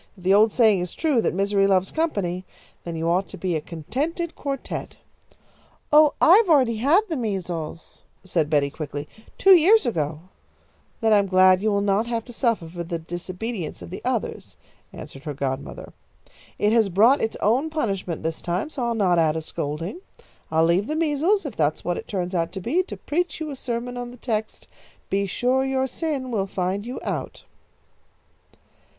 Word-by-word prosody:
If 180 Hz, -, -15 dB
the 190 Hz, +2 st, +4 dB
old 215 Hz, +2 st, +5 dB
saying 215 Hz, -6 st, +4 dB
is 180 Hz, -, -5 dB
true 295 Hz, -8 st, +2 dB
that -, -, +1 dB
misery 195 Hz, +2 st, +2 dB
loves 190 Hz, -1 st, +2 dB
company, 200 Hz, -, -1 dB, 0.4 s
then 170 Hz, -1 st, -4 dB
you 165 Hz, +1 st, -2 dB
ought 180 Hz, +3 st, +1 dB
to 195 Hz, -, -9 dB
be 180 Hz, -1 st, -1 dB
a 155 Hz, -, -1 dB
contented 275 Hz, -, -4 dB
quartette." 275 Hz, -2 st, -5 dB, 1.0 s
"Oh, 300 Hz, 0 st, +6 dB
I've 380 Hz, +4 st, +6 dB
already 255 Hz, -8 st, +4 dB
had 290 Hz, -, +4 dB
the 330 Hz, -, -2 dB
measles," 180 Hz, -, -4 dB, 0.2 s
said 170 Hz, -5 st, 0 dB
Betty, 145 Hz, -2 st, +2 dB
quickly, 145 Hz, -1 st, -6 dB, 0.3 s
"two 385 Hz, -1 st, +7 dB
years 390 Hz, +7 st, +5 dB
ago." 155 Hz, -8 st, -2 dB, 0.8 s
"Then 220 Hz, -1 st, +4 dB
I'm 200 Hz, -1 st, +4 dB
glad 185 Hz, 0 st, +5 dB
that -, -, -9 dB
you 215 Hz, -, +2 dB
will 200 Hz, 0 st, +1 dB
not 205 Hz, +3 st, +1 dB
have 230 Hz, -1 st, -2 dB
to 245 Hz, -, -11 dB
suffer 230 Hz, -8 st, 0 dB
for 170 Hz, +1 st, -6 dB
the 170 Hz, 0 st, -4 dB
disobedience 175 Hz, -, -5 dB
of 85 Hz, -, -10 dB
the -, -, -6 dB
others," -, -, -3 dB, 0.3 s
answered 135 Hz, -, -10 dB
her 150 Hz, -2 st, -4 dB
godmother. 135 Hz, 0 st, -5 dB, 0.6 s
"It 210 Hz, -, +2 dB
has 225 Hz, -3 st, +3 dB
brought 225 Hz, +10 st, +4 dB
its 220 Hz, -, -2 dB
own 255 Hz, +9 st, +2 dB
punishment 195 Hz, -, -3 dB
this 160 Hz, 0 st, -3 dB
time, 180 Hz, -, -2 dB
so 255 Hz, -5 st, -3 dB
I'll 235 Hz, -, -1 dB
not 185 Hz, -5 st, +3 dB
add 160 Hz, -1 st, +2 dB
a -, -, -2 dB
scolding. 155 Hz, -, -4 dB, 0.5 s
I'll 160 Hz, +1 st, +3 dB
leave 180 Hz, +6 st, +2 dB
the 305 Hz, -, -2 dB
measles, 330 Hz, +5 st, +1 dB
if 265 Hz, -7 st, -5 dB
that's 155 Hz, -1 st, 0 dB
what 175 Hz, 0 st, -1 dB
it -, -, -10 dB
turns 180 Hz, -2 st, -3 dB
out 170 Hz, -1 st, 0 dB
to 195 Hz, -, -4 dB
be, 265 Hz, -, +1 dB
to -, -, -7 dB
preach 335 Hz, +1 st, -2 dB
you 310 Hz, -2 st, -4 dB
a -, -, -5 dB
sermon 245 Hz, -1 st, -4 dB
on 245 Hz, 0 st, -5 dB
the 245 Hz, -, -12 dB
text, 220 Hz, -3 st, -4 dB, 0.4 s
'Be 200 Hz, 0 st, +1 dB
sure 250 Hz, +7 st, +1 dB
your 265 Hz, 0 st, 0 dB
sin 265 Hz, -1 st, -3 dB
will 200 Hz, -4 st, -1 dB
find 190 Hz, +3 st, -2 dB
you 250 Hz, -, -5 dB
out.'" -, -, -4 dB
205 Hz, 190 wpm, -24 LUFS, 175-260 Hz, 1.0 s, two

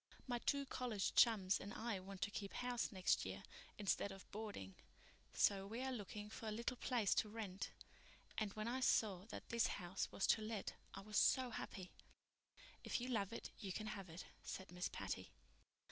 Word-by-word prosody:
My 245 Hz, -2 st, 0 dB
two 280 Hz, +3 st, +2 dB
college 240 Hz, -7 st, 0 dB
chums 200 Hz, -5 st, +6 dB
and 200 Hz, -, -5 dB
I 225 Hz, -4 st, -1 dB
want 190 Hz, 0 st, -5 dB
to 205 Hz, -, 0 dB
keep 200 Hz, -1 st, -4 dB
house 245 Hz, -1 st, 0 dB
next 185 Hz, -3 st, +3 dB
year 95 Hz, +1 st, -4 dB, 0.3 s
instead 200 Hz, -1 st, +2 dB
of 195 Hz, -1 st, -10 dB
boarding, 205 Hz, -, -4 dB, 0.6 s
so 195 Hz, -1 st, +4 dB
we 230 Hz, +5 st, -3 dB
are 265 Hz, -, 0 dB
looking 210 Hz, -3 st, -4 dB
for 220 Hz, +1 st, -6 dB
a -, -, 0 dB
little 235 Hz, +3 st, -1 dB
place 235 Hz, -7 st, +3 dB
to 215 Hz, -, +2 dB
rent; 205 Hz, -3 st, -3 dB, 0.7 s
and 215 Hz, -2 st, 0 dB
when 215 Hz, +1 st, -2 dB
I 250 Hz, +2 st, +1 dB
saw 205 Hz, -7 st, +3 dB
that 225 Hz, -, -7 dB
this 235 Hz, -1 st, +4 dB
house 180 Hz, -1 st, -2 dB
was 195 Hz, -, +1 dB
to 220 Hz, -, -2 dB
let 215 Hz, -2 st, -2 dB, 0.2 s
I -, -, -5 dB
was 210 Hz, +1 st, -2 dB
so 255 Hz, -2 st, +5 dB
happy." 185 Hz, -4 st, -5 dB, 0.9 s
"If -, -, 0 dB
you 250 Hz, +2 st, -2 dB
love 210 Hz, -5 st, +1 dB
it, 230 Hz, -, -5 dB
you 195 Hz, -, -3 dB
can 215 Hz, +3 st, -2 dB
have 195 Hz, -3 st, -6 dB
it," 165 Hz, +2 st, -6 dB, 0.2 s
said 190 Hz, -2 st, -5 dB
Miss 180 Hz, 0 st, -1 dB
Patty. -, -, -3 dB
210 Hz, 190 wpm, -43 LUFS, 195-235 Hz, 0.9 s, chums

